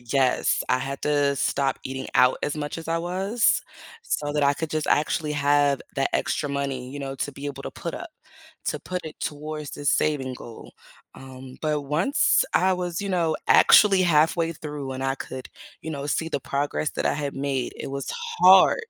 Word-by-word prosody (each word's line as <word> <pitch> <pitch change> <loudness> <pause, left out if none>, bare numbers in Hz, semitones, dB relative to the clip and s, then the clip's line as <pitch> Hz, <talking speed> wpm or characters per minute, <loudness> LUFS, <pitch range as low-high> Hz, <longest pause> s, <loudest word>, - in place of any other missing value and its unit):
Yes, 125 +2 +1
I 125 0 +3
had 135 +1 -5
to 145 -1 +2
stop 135 0 0
eating 130 0 -5
out 125 0 +5
as 145 - -1
much 145 +1 -4
as 165 - -8
I 165 0 +1
was. 190 +7 +1 0.4
So 145 - -2
that 150 -1 0
I 140 - +4
could 160 +1 -4
just 155 -1 -1
actually 150 0 +1
have 145 -1 +2 0.2
that 135 - +1
extra 145 - -1
money, 135 -2 -3
you 145 - -7
know, 135 -1 -4
to 145 - -3
be 140 +1 -7
able 135 -1 -6
to - - -4
put 170 - -6
up. 350 -2 -7 0.6
To 150 - -2
put 180 -1 -5
it 155 - -10
towards 150 0 -5
the 145 - -7
saving 135 -4 +1
goal. 115 -2 -11 0.4
Um, 130 -1 -11
but 150 -1 0
once 175 - +2
I 190 +1 +4
was, 175 -1 -3
you 200 - -4
know, 170 -4 +1
actually 195 -3 +6
halfway 165 0 +3
through 145 -3 -6
and 130 +1 -5
I 135 0 +1
could, 130 -1 -8 0.3
you 160 - -6
know, 140 -2 -4
see 160 +2 -1
the 145 - -2
progress 145 +2 -2
that - - -1
I - - +1
had 145 -1 -3
made, 135 -2 -2
it - - -6
was 140 0 -4 0.3
hard. 460 - +7
145 Hz, 195 wpm, -25 LUFS, 135-160 Hz, 0.6 s, hard